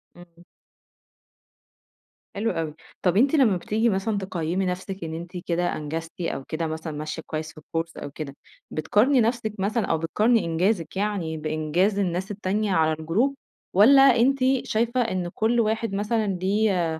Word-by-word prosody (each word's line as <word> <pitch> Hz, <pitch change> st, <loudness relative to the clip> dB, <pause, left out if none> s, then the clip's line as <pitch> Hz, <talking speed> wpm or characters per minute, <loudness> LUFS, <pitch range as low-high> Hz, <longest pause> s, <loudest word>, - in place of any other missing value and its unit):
إمم. 175 Hz, -1 st, -16 dB, 1.9 s
حلو 220 Hz, +3 st, 0 dB
أوي. 160 Hz, -2 st, -3 dB, 0.3 s
طَب 180 Hz, +1 st, +2 dB
أنتِ 275 Hz, +6 st, +4 dB
لمّا 225 Hz, -10 st, +4 dB
بتيجي 220 Hz, +6 st, 0 dB
مثلًا 200 Hz, +2 st, 0 dB
تقيّمي 185 Hz, -1 st, -2 dB
نفسِك 185 Hz, +1 st, -4 dB
إن 160 Hz, 0 st, -5 dB
أنتِ 170 Hz, +2 st, -7 dB
كده 175 Hz, 0 st, 0 dB
أنجزتِ، 160 Hz, +3 st, -5 dB
أو 150 Hz, -5 st, -3 dB
كده 160 Hz, +2 st, -3 dB
مثلًا 160 Hz, 0 st, -5 dB
ماشية 155 Hz, +2 st, -5 dB
كويس 155 Hz, 0 st, -4 dB
في -, -, -25 dB
الكورس، 165 Hz, +2 st, -5 dB
أو 140 Hz, -, -6 dB
كده. 140 Hz, -2 st, -7 dB, 0.4 s
بتقارني 235 Hz, -, +3 dB
نفسِك 225 Hz, -2 st, 0 dB
مثلًا 210 Hz, +3 st, 0 dB
أو 165 Hz, -, +1 dB
بتقارني 215 Hz, +7 st, +2 dB
إنجازِك 175 Hz, +2 st, 0 dB
يعني 195 Hz, -6 st, -1 dB
بإنجاز 155 Hz, +6 st, 0 dB
الناس 185 Hz, +2 st, -1 dB
التانية 205 Hz, +1 st, -1 dB
على 160 Hz, -1 st, +3 dB
الجروب، 220 Hz, -, +1 dB, 0.4 s
والَّا 260 Hz, +9 st, +7 dB
أنتِ 270 Hz, +1 st, +4 dB, 0.3 s
شايفة 235 Hz, +3 st, +1 dB
إن 185 Hz, -6 st, -1 dB
كل 230 Hz, +2 st, +1 dB
واحد 220 Hz, -1 st, 0 dB
مثلًا 215 Hz, +1 st, 0 dB
ليه 185 Hz, -5 st, +1 dB
185 Hz, 150 wpm, -25 LUFS, 165-220 Hz, 1.9 s, والَّا